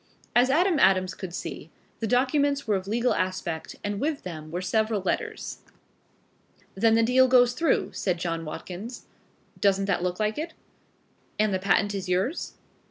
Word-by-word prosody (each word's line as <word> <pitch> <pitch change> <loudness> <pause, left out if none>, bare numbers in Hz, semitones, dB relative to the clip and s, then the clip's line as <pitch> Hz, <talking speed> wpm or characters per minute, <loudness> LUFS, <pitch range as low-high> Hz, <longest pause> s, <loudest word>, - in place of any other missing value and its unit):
As 245 +2 +5
Adam 335 +3 +3
Adams 185 -2 +4
could 190 -3 -7
see, - - -6 0.3
the 225 - -1
documents 280 +4 +2
were 215 -3 +1
of 190 0 -3
legal 235 +4 +1
aspect 185 -3 -3
and 205 -1 -2
with 300 0 -1
them 155 -4 -7
were 175 +3 -3
several 215 +3 0
letters. 190 - -3 1.1
"Then 225 +3 +3
the 230 - +4
deal 255 +3 +5
goes 245 -1 +5
through," 315 +3 +1
said 180 -3 -1
John 165 -1 -3
Watkins. 190 +9 -7 0.5
"Doesn't 195 -1 +3
that 195 -3 0
look 180 +1 -2
like 215 +4 0
it?" 320 +1 -5 0.8
"And 215 -1 +2
the 190 - +1
patent 200 +2 +2
is 190 -2 -4
yours?" 190 - -1
205 Hz, 165 wpm, -26 LUFS, 185-250 Hz, 1.1 s, As